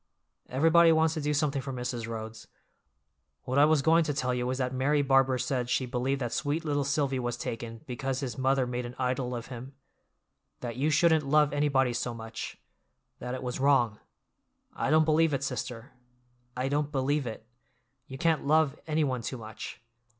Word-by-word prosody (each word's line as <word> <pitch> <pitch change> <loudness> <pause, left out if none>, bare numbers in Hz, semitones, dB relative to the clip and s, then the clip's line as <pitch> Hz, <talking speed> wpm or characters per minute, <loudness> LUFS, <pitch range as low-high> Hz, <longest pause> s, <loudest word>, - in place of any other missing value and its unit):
Everybody 165 +5 +5
wants 160 0 +3
to 160 - -3
do 150 +1 0
something 145 -1 0
for 135 +1 -5
Mrs. 125 -2 -4
Rhodes. 110 -1 -7 1.0
What 130 +2 0
I 145 - +8
was 155 -2 +3
going 165 +2 +5
to 145 -2 -2
tell 125 -3 0
you 125 0 -1
was 130 0 -1
that 130 -1 -1
Mary 140 +3 +2
Barbour 135 -1 +3
said 125 -1 -1
she 130 - +1
believed 130 +2 -1
that 120 -2 -2
sweet 160 +1 -1
little 145 -2 0
Silvy 140 -1 0
was 120 -1 -2
taken 115 -1 -5
because 130 +1 -3
his 130 -5 -4
mother 135 +1 +2
made 125 0 -3
an 120 - -10
idol 125 -1 -1
of 120 0 -5
him; 130 +3 -9 0.9
that 120 -2 -4
you 140 +5 +1
shouldn't 160 -1 +3
love 150 -1 +4
anybody 140 -4 +2
so 120 0 -3
much—that 115 +2 -9
it 130 - -6
was 125 0 -3
wrong. 130 -6 +3 0.7
I - - -2
don't 155 0 +5
believe 155 -1 +3
it, 135 - -3
sister! 125 -1 -4 0.7
I 130 +1 0
don't 145 +1 0
believe 140 0 0
it; 110 -1 -7 0.6
you 135 - -8
can't 160 -1 +1
love 155 -1 +3
anyone 150 -5 0
too 130 +2 -4
much! 110 +2 -9
135 Hz, 180 wpm, -29 LUFS, 125-150 Hz, 1.0 s, I